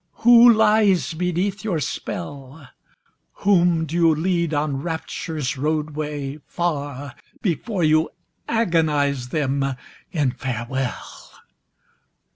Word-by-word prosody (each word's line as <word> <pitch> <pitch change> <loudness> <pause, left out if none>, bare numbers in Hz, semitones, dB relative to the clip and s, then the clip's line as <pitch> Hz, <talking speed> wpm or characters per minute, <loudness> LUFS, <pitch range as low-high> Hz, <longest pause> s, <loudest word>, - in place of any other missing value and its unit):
Who 240 0 +9
lies 210 -5 +3
beneath 180 +4 -1
your 190 -7 -1
spell? 140 -1 -6 0.8
Whom 175 -4 +4
do 160 - -8
you 165 -2 +4
lead 170 0 0
on 145 -2 -1
Rapture's 160 -4 -4
roadway, 150 -1 -3
far, 145 -5 -3 0.3
Before 185 - -1
you 155 +1 +3 0.4
agonise 150 - +1
them 140 -1 0 0.5
in 145 -6 +1
farewell? 125 +1 -5
155 Hz, 90 wpm, -22 LUFS, 140-175 Hz, 0.8 s, Who